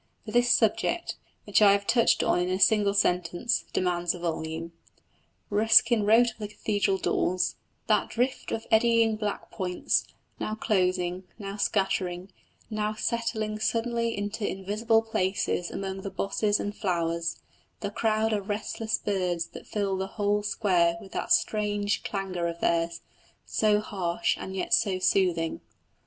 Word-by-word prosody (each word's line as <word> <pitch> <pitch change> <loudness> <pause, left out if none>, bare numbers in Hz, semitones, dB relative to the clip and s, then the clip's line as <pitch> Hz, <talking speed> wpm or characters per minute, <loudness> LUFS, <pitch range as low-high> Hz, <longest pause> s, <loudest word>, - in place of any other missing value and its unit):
But 215 - -7
this 240 0 +3
subject, 225 +10 +1 0.3
which 205 +1 +2
I 200 -1 +7
have 200 0 0
touched 230 +1 +3
on - - +2
in 180 +1 0
a 185 +1 -1
single 205 -1 +4
sentence, 180 +2 +1
demands 175 -1 0
a - - -9
volume. 165 0 -4 0.8
Ruskin 220 +1 +5
wrote 230 +2 +5
of 220 - -21
the 210 - -4
cathedral 205 -2 0
daws, 185 0 0 0.3
"That - - +2
drift 250 +3 -2
of 225 - -3
eddying 225 0 +4
black 210 -1 -4
points, 180 -3 -1 0.3
now 215 - -2
closing, 185 -3 0
now 200 -2 -6
scattering, 190 -2 -1 0.4
now 215 -1 -2
settling 220 -2 -2
suddenly 230 0 0
into 205 +2 -4
invisible 215 +4 +1
places 190 -4 -1
among 190 0 -5
the 195 - -5
bosses 205 +1 0
and 205 0 -4
flowers, 170 -4 -1 0.4
the 205 - -3
crowd 220 +1 +1
of 205 -1 -3
restless 220 +1 -2
birds 180 -4 -1
that - - -11
fill 200 -2 -1
the 190 0 -2
whole 205 0 +1
square 180 -5 +1
with 195 - -13
that - - -4
strange 205 -1 +1
clangour 190 -4 -3
of 170 0 -5
theirs, 170 0 0 0.4
so 210 -1 +2
harsh 195 0 -1
and 190 - -6
yet 190 - -2
so 195 -4 +3
soothing." 180 -3 +1
205 Hz, 145 wpm, -27 LUFS, 185-220 Hz, 0.8 s, I